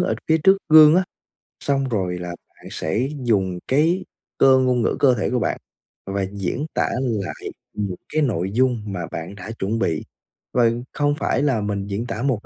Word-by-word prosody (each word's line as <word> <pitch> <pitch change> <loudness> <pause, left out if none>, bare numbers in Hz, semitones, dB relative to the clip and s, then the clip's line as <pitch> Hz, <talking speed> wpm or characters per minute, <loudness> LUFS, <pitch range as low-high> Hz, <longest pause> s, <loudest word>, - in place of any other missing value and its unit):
ở 180 - +1
phía 160 0 +4
trước 190 +5 +5
gương 155 0 +8
á, 185 - +3 0.6
xong 135 -1 0
rồi 95 -6 -1
là 90 0 -5
bạn 85 - -12
sẽ 110 +12 -1 0.2
dùng 95 -6 +1
cái 165 +7 +2 0.3
cơ 130 -1 +6
ngôn 125 -2 +2
ngữ - - +1
cơ 130 -3 +5
thể 110 - -1
của 125 - 0
bạn - - -1 0.5
và 100 0 -2
diễn 100 +8 -3
tả - - +1
lại 110 -8 -3 0.2
những 100 -3 -3 0.2
cái 155 - +2
nội 95 - 0
dung 125 0 +1
mà 90 -4 -4
bạn 85 +5 -6
đã 100 +2 -8
chuẩn 105 +4 -1
bị. 80 -8 0 0.5
Và 120 -2 +4 0.2
không 145 0 +1
phải - - 0
là 130 -7 +1
mình 100 -1 -3
diễn 105 +4 -3
tả 115 -2 -4
1 130 -6 -1
115 Hz, 195 wpm, -22 LUFS, 100-135 Hz, 0.6 s, gương